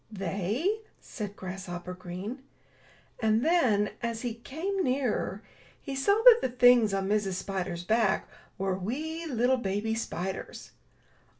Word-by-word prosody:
"They!" 205 - -1 0.2
said 205 -4 -7
Grasshopper 185 -2 -6
Green. 185 +8 -6 0.8
And 220 +2 +2
then, 245 -12 +3
as 230 0 -3
he 240 -2 -2
came 330 - -3
nearer, 250 - -1 0.4
he 275 -2 -6
saw 400 +11 +2
that 480 -2 +10
the - - 0
things 245 -3 +5
on 195 0 -1
Mrs. 205 -2 +1
Spider's 185 -2 -3
back 220 +2 +2 0.3
were 190 0 0
wee 310 - -4
little 255 -1 +2
baby 210 0 -1
spiders. 190 -4 -5
220 Hz, 125 wpm, -29 LUFS, 190-260 Hz, 0.8 s, that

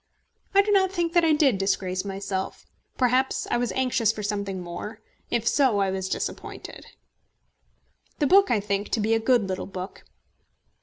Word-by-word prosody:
I 400 - +7
do 415 - -1
not 380 -2 +4
think 345 -3 -1
that 345 -1 +4
I 325 - +4
did 280 -9 +3
disgrace 190 -1 -1
myself. 195 -1 -4 0.3
Perhaps 255 +1 +1
I - - +2
was 240 -1 -1
anxious 250 -4 +2
for 215 -1 -7
something 200 -2 -2
more. 180 +5 -7 0.3
If 235 -1 -1
so, 260 -7 +3
I 195 -1 +1
was 190 0 -3
disappointed. - - -5 1.3
The 295 - +1
book 390 +6 +5
I 220 - +3
think 200 0 -2
to 230 - +2
be 220 +1 +1
a 225 - +3
good 225 -2 +2
little 185 -1 -4
book. 185 0 -7
220 Hz, 170 wpm, -25 LUFS, 195-265 Hz, 1.3 s, I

